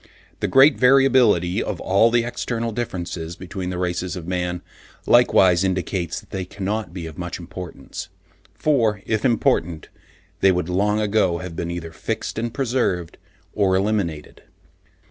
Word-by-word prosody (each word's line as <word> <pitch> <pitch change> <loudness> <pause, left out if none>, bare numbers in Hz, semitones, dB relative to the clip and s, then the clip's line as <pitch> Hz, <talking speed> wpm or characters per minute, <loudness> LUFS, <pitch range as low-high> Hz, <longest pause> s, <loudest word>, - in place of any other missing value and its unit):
The - - 0
great 135 +3 +5
variability 125 -8 +4
of - - -4
all 100 +5 +3
the 120 0 +2
external 115 -1 -3
differences 85 -7 -4
between 90 0 -6
the 90 - -4
races 90 0 -2
of 90 -3 -7
man, 90 -1 -2 0.4
likewise 95 -7 +5
indicates 95 -2 -2
that - - -20
they 95 - -3
cannot 100 +2 -4
be 90 -2 -6
of 80 -1 -9
much 90 0 -4
importance; 90 0 -8 0.5
for 115 -9 +1
if 110 -1 -1
important, 85 - +1 0.5
they 95 - +5
would 90 -1 -1
long 105 +4 +1
ago 105 -5 +1
have 90 -1 -7
been 85 - -3
either 85 -1 -5
fixed 85 - -4
and 115 +1 -2
preserved, 115 - -1 0.3
or 95 -3 +2
eliminated. 95 -6 -2
95 Hz, 145 wpm, -22 LUFS, 90-110 Hz, 0.5 s, great